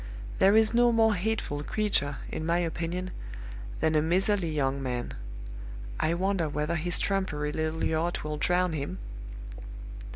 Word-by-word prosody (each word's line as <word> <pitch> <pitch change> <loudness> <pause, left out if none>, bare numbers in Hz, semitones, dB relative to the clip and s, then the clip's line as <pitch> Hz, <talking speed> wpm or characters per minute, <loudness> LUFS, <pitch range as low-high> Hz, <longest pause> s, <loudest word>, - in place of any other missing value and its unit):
There 195 +2 +6
is 220 0 +5
no 240 0 +5
more 225 -1 +5
hateful 200 -7 -1
creature, 150 -6 +1
in - - -3
my 170 +2 +2
opinion, 175 +2 -2 0.7
than 160 - +3
a 155 - +4
miserly 185 +2 +2
young 140 -2 0
man. 125 -2 -2 0.9
I 165 - +2
wonder 185 -3 +1
whether 150 +3 -1
his 175 +2 0
trumpery 160 -7 0
little 160 +1 -1
yacht 165 +2 0
will 150 0 -3
drown 180 +2 +2
him? 140 -10 -3
170 Hz, 140 wpm, -29 LUFS, 150-190 Hz, 0.9 s, There